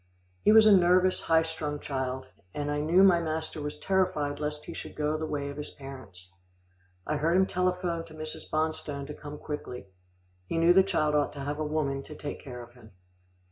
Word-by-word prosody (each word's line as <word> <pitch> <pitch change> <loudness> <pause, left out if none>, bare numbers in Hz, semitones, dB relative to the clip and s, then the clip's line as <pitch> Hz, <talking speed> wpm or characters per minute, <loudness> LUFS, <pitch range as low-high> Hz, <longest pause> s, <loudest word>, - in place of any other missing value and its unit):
He - - +5
was 220 0 +8
a 215 - +7
nervous, 185 0 +5
high 160 0 +3
strung 155 -2 -4
child, 130 -2 -3 0.3
and 145 0 -2
I 145 - 0
knew 165 +6 +4
my 180 -3 +6
master 160 -1 -3
was 145 0 -4
terrified 180 -7 0
lest 150 0 -4
he - - -7
should - - -8
go 150 0 0
the 155 0 -3
way 140 -2 -3
of 140 - -8
his 150 - -5
parents. 105 -11 -11 0.7
I 150 - -1
heard 165 +4 +2
him 190 - +5
telephone 180 -2 -1
to 155 - -13
Mrs. 155 0 -6
Bonstone 155 -2 -2
to 150 - -7
come 150 0 -8
quickly. 125 -9 -6 0.6
He 165 - -2
knew 165 +1 +6
the 190 - +7
child 160 -6 +1
ought 145 -1 +1
to 145 - -7
have 145 +2 -3
a - - 0
woman 150 -3 -1
to 150 - -10
take 145 - -6
care 125 -3 -8
of 120 0 -15
him. 110 -4 -17
150 Hz, 210 wpm, -29 LUFS, 145-165 Hz, 0.7 s, was